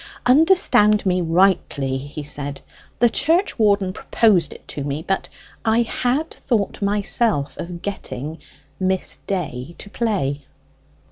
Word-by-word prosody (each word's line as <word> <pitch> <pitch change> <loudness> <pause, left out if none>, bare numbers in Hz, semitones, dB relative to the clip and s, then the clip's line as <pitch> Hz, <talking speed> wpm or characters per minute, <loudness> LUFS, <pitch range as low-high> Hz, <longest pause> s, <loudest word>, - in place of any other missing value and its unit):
"Understand 250 - +4
me 185 -1 +2
rightly," 165 -6 +2
he 145 +2 -7
said: 145 -1 -5 0.4
"the 240 - +5
church 325 - +1
warden 200 -3 +3
proposed 195 -9 +2
it - - -13
to 145 - -4
me, 145 +3 -4
but 195 - -1 0.3
I 225 +1 +3
had 255 +7 -1
thought 215 -5 -2
myself 200 - 0
of 170 0 -6
getting 155 -6 -5 0.4
Miss 190 0 -1
Day 165 -5 -3
to 205 - -10
play." 180 - -1
190 Hz, 125 wpm, -21 LUFS, 150-220 Hz, 0.4 s, the